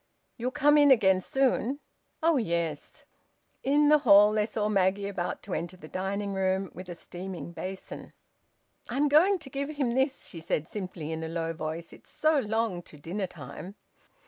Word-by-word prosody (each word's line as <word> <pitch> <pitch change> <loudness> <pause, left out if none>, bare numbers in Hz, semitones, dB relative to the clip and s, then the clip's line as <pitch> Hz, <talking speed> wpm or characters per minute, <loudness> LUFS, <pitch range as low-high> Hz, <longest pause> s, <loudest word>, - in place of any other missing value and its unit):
"You'll 245 +1 -2
come 295 +2 +4
in 290 -1 +6
again 190 -7 +5
soon?" 265 +3 +1 0.4
"Oh 330 -2 +4
yes." 170 - -2 0.6
In 290 +2 +3
the 300 0 +6
hall 205 -6 +7
they 215 0 +1
saw 210 -2 -1
Maggie 200 -1 +1
about 185 -3 -4
to 195 - -6
enter 175 +3 -4
the 155 - -11
dining 200 +3 -3
room 190 0 0
with 185 0 -9
a 175 - -5
steaming 180 0 -7
basin. 190 +2 -7 0.8
"I'm 275 +5 +1
going 340 +7 +5
to 310 -6 -9
give 280 +1 -3
him 280 -6 -1
this," 265 +2 0
she 170 - -7
said 160 -1 -2
simply 180 -6 -6
in 160 0 -4
a - - -3
low 165 0 -2
voice. 160 +1 -5
"It's - - -15
so 310 -1 +2
long 220 -5 -1
to 155 - -15
dinner 185 +7 -4
time." 175 +5 -9
200 Hz, 175 wpm, -28 LUFS, 175-265 Hz, 0.8 s, hall